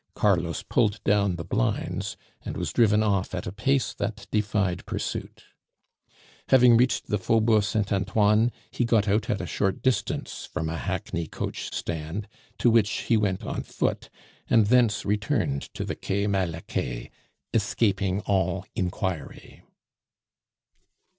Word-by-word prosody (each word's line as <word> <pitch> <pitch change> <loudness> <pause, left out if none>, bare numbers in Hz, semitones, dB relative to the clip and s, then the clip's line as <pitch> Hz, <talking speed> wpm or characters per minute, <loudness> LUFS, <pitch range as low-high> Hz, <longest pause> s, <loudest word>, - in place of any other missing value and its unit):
Carlos 85 -5 +1
pulled 105 -1 +1
down 100 -3 +2
the 85 - -5
blinds, - - -1 0.3
and - - -5
was - - -3
driven 110 -2 +4
off 100 -3 0
at 90 - -4
a - - -4
pace 135 +7 0
that 110 0 -4
defied 105 -4 0
pursuit. - - -4 1.1
Having 125 -2 +7
reached 125 +2 +2
the 105 - -1
Faubourg 110 +2 +3
Saint 100 0 -1
Antoine, 105 +4 +3 0.2
he - - 0
got 115 -3 +2
out 105 +2 +1
at 105 - 0
a - - -3
short 95 +2 -1
distance 130 -2 -1
from 80 - -2
a 80 - -3
hackney 85 0 -3
coach - - -5
stand, 85 +6 -4 0.3
to 120 - +4
which 110 -3 +4
he 115 - 0
went 100 -3 0
on - - -3
foot, - - -2 0.4
and 115 -2 +5
thence 115 -2 +3
returned 100 -9 -1
to - - -3
the - - -3
Quai 100 +1 -1
Malaquais, 85 -10 -2 0.4
escaping 100 -3 +1
all 95 -2 0
inquiry. 90 -2 -4
100 Hz, 140 wpm, -26 LUFS, 95-110 Hz, 1.1 s, Having